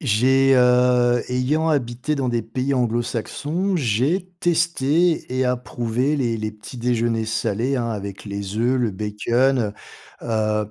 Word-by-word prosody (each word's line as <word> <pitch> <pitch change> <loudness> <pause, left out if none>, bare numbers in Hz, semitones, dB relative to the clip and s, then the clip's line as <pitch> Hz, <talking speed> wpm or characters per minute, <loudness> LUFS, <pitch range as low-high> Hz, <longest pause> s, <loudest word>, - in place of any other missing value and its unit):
J'ai, 135 - +3
heu 125 -1 +4
ayant 140 +6 0
habité 125 0 -1
dans 130 -3 -1
des 120 -1 0
pays 130 +5 -2
anglo-saxons, 125 - -1
j'ai 145 - 0
testé 165 -2 +1
et 130 - +1
approuvé 125 +2 -1
les 120 -4 -1
les 110 0 -3
petits 110 +4 -11
déjeuners 115 -2 0
salés, 115 +4 -1
hein, 115 -1 -1
avec 100 -2 -6
les 100 0 -5
oeufs, 125 +3 +1
le 120 -3 +1
bacon. 115 +6 0 0.6
Heu - - -8
heu, 110 -2 0
125 Hz, 140 wpm, -22 LUFS, 115-135 Hz, 0.6 s, heu